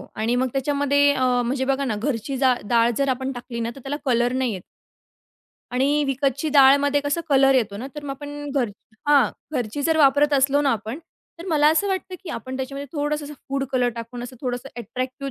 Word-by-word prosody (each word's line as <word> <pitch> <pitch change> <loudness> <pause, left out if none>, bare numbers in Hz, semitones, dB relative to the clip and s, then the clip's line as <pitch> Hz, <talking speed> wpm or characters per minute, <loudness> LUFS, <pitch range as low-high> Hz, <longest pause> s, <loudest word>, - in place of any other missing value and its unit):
आणि 225 +3 0
मग 255 +1 +1
त्याच्यामध्ये 285 +1 +2
अ, 260 -2 +1 0.2
म्हणजे 265 +2 -1
बघा 275 +1 0
ना, 225 -5 -1
घरची 265 0 -2
जा 260 -1 +4 0.2
डाळ 235 0 +4
जर 275 - +1
आपण 260 +1 -1
टाकली 245 -2 -7
ना, 230 0 -2
तर - - -10
त्याला 275 +2 -2
कलर 245 -1 +2
नाही 255 -3 0
येत. 185 - -6 1.1
आणि 285 +4 +2
विकतची 275 +2 0
डाळमध्ये 285 0 +5
कसा 285 +4 0
कलर 270 -1 +5
येतो 220 -6 +1
ना, 240 +6 -5
तर 295 - -7
मग 280 - -4
आपण 290 +1 -6
घर 270 -4 0 0.4
हां, 280 -6 +5 0.2
घरची 245 +1 -2
जर 320 +2 +2
वापरत 290 0 +4
असलो 280 +1 +3
ना, 280 - +2
आपण 225 +4 -4 0.4
तर 345 - -8
मला 300 -4 +4
असं 325 +6 +1
वाटतं 375 -1 -3
की 370 - -7
आपण 260 +3 -5
त्याच्यामध्ये 275 +2 -5
थोडंसं 295 0 -2 0.2
फूड 275 0 -1
कलर 250 -2 +2
टाकून 230 +1 -6
असं 250 +1 -8
थोडंसं 250 0 -4
अट्रॅक्टिव्ह 255 +4 -5
270 Hz, 200 wpm, -23 LUFS, 245-285 Hz, 1.1 s, डाळमध्ये